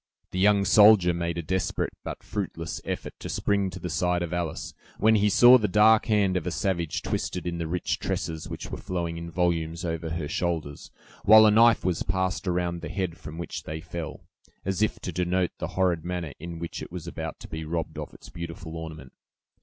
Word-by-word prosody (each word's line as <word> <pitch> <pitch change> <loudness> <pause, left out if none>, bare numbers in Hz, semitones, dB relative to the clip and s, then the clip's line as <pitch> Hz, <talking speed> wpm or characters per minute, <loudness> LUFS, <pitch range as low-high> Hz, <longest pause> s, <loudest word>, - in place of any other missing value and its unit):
The 95 - -3
young 100 0 +4
soldier 105 -3 +7
made 85 0 -2
a 85 - -3
desperate 95 +3 -1
but - - -6
fruitless 85 -6 -4
effort - - -4
to - - -6
spring 100 -1 0
to 90 0 -8
the 90 - -4
side 90 +3 +1
of 85 0 -4
Alice, 85 -2 -3 0.2
when 110 +2 +4
he 105 -1 +4
saw 120 +5 +8
the 105 - +1
dark 105 +3 +5
hand 100 -4 +2
of 90 -1 -1
a - - +2
savage 85 0 -1
twisted 90 - -3
in 85 -1 -3
the 85 - -2
rich 90 +2 -1
tresses 80 -1 -3
which - - -7
were - - -5
flowing 85 -2 -3
in 85 0 -6
volumes 85 0 -1
over 80 -1 -3
her 80 -2 -3
shoulders, 80 -3 -3 0.3
while 110 +1 +9
a 105 - +6
knife 115 -1 +5
was 90 -3 0
passed 95 +2 -1
around 85 -1 -1
the - - -6
head 95 -4 -2
from 75 0 -9
which 85 - -5
they 80 +1 -6
fell, 80 -1 -6 0.4
as 95 +1 -1
if 110 - +1
to 90 - -4
denote 90 +1 0
the - - -2
horrid 90 -4 +2
manner 90 -4 -4
in 85 +1 -7
which 85 0 -6
it - - -8
was 90 -2 -6
about 80 -2 -6
to - - -10
be 80 0 -5
robbed 80 -1 -3
of 75 - -6
its - - -14
beautiful 85 -1 -7
ornament. 80 -5 -8
85 Hz, 210 wpm, -26 LUFS, 80-95 Hz, 0.4 s, while